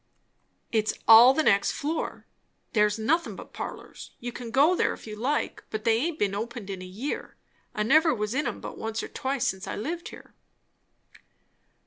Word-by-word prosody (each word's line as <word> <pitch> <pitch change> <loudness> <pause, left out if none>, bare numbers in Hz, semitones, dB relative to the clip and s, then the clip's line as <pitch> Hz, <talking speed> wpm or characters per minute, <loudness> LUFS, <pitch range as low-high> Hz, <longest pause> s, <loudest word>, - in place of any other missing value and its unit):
"It's 215 -2 +1
all 230 +3 +10
the 315 +4 +1
next 200 -6 +3
floor. 310 +3 -3 0.5
There's 210 -1 +3
nothin' 310 +11 0
but - - -11
parlours. - - -8
You 245 0 -5
can 240 -1 -7
go 285 +9 +4
there - - +1
if - - -12
you 215 -1 -7
like; 265 +7 -2
but 215 0 -4
they 225 -1 +3
aint 315 +4 -1
been 200 -8 0
opened 220 -1 -5
in 190 -1 -6
a - - -7
year. 215 +11 -5 0.4
I 210 - 0
never 315 +8 +5
was 210 -3 -2
in 280 0 0
'em 235 - -5
but - - -8
once 225 0 -3
or - - -4
twice 265 -1 -2
since 190 +2 -2
I - - -3
lived 335 +10 -4
here." - - -13
230 Hz, 185 wpm, -27 LUFS, 210-285 Hz, 0.5 s, all